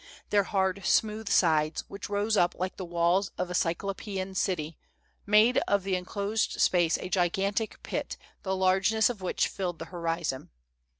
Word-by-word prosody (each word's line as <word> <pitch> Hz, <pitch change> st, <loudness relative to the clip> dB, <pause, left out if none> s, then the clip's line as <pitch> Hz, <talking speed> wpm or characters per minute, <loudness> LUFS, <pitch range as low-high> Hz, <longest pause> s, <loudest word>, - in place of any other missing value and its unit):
Their 205 Hz, -1 st, +3 dB
hard, 190 Hz, -1 st, 0 dB
smooth 215 Hz, +2 st, +1 dB
sides, 155 Hz, -3 st, +2 dB
which 200 Hz, +1 st, -8 dB
rose 205 Hz, +2 st, 0 dB
up 175 Hz, -3 st, +2 dB
like 185 Hz, +1 st, -3 dB
the 190 Hz, -, -5 dB
walls 175 Hz, +3 st, +1 dB
of 180 Hz, -1 st, -2 dB
a -, -, -3 dB
cyclo[)ean 190 Hz, +2 st, -2 dB
city, 165 Hz, -5 st, -2 dB, 0.5 s
made 215 Hz, +4 st, +5 dB
of 200 Hz, -1 st, +2 dB
the 195 Hz, -1 st, 0 dB
enclosed 200 Hz, +4 st, -2 dB
space 175 Hz, -3 st, +3 dB
a -, -, -6 dB
gigantic 195 Hz, +4 st, -1 dB
pit -, -, -4 dB, 0.2 s
the 190 Hz, -1 st, -2 dB
largeness 190 Hz, +5 st, +3 dB
of 215 Hz, -5 st, -10 dB
which 185 Hz, -, 0 dB
filled 180 Hz, -3 st, -4 dB
the 165 Hz, -, -7 dB
horizon. 165 Hz, -5 st, -3 dB
190 Hz, 160 wpm, -28 LUFS, 175-200 Hz, 0.5 s, made